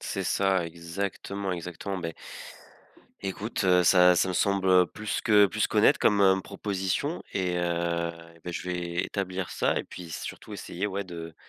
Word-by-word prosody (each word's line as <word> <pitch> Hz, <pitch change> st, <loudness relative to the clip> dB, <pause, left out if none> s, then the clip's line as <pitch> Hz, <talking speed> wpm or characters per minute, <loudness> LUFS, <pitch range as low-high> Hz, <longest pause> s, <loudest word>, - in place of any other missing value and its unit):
C'est -, -, -3 dB
ça, 95 Hz, -3 st, +2 dB
exactement, 95 Hz, +3 st, -4 dB
exactement, 90 Hz, +3 st, -5 dB
beh 85 Hz, -2 st, -5 dB, 1.1 s
écoute, 100 Hz, +2 st, -3 dB
heu, 90 Hz, -1 st, +5 dB
ça 90 Hz, 0 st, +6 dB
ça 95 Hz, -, +2 dB
me -, -, -1 dB
semble, 100 Hz, 0 st, +1 dB
heu, 90 Hz, -1 st, +6 dB
plus 105 Hz, +3 st, -4 dB
que 105 Hz, -2 st, +5 dB
plus -, -, 0 dB
qu'honnête, -, -, +4 dB
comme, 100 Hz, -1 st, +3 dB
hem, 95 Hz, -1 st, +5 dB
proposition, 100 Hz, -, -2 dB
et 90 Hz, -2 st, -1 dB
heu, 85 Hz, -1 st, -1 dB, 0.2 s
et -, -, -18 dB
beh, 90 Hz, -, -4 dB
je -, -, -4 dB
vais 90 Hz, -1 st, -2 dB
établir 95 Hz, -2 st, -3 dB
ça, -, -, 0 dB
et -, -, 0 dB
puis 90 Hz, -2 st, -10 dB
surtout 75 Hz, -, -7 dB
essayer, 95 Hz, +4 st, -4 dB
ouais, 100 Hz, 0 st, -2 dB
de 85 Hz, -3 st, -8 dB
90 Hz, 170 wpm, -27 LUFS, 85-100 Hz, 1.1 s, ça